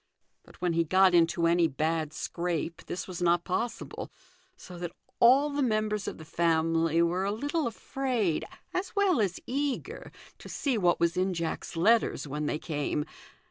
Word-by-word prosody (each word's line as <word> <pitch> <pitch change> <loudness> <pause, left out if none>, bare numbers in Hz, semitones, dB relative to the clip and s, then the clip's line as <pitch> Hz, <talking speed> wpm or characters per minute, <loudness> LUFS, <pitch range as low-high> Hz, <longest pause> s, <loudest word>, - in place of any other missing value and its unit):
But - - -19
when 175 -2 +1
he 165 0 +2
got 185 +3 +4
into 170 0 +3
any 170 0 +4
bad 155 +1 -1
scrape 170 0 -3
this 180 - -4
was 180 -2 -6
not 175 0 +3
possible, 230 +6 -3 0.5
so 180 - -11
that 175 -1 -5 0.3
all 270 +5 +6
the 285 0 -1
mAibers 215 -4 0
of - - -4
the 160 - -11
family 165 0 +2
were 175 +3 0
a 200 - 0
little 290 +7 -1
afraid, 235 - -1 0.3
as 370 +3 -3
well 385 - +3
as 190 -3 -1
eager, 280 +1 -3 0.3
to - - -11
see 275 -4 -1
what 180 -5 +2
was 170 +1 +1
in 185 0 +1
Jack's 165 0 -4
letters 215 -1 +2
when 150 +2 -3
they 150 - -1
came. 150 -1 -2
175 Hz, 170 wpm, -29 LUFS, 165-230 Hz, 0.5 s, all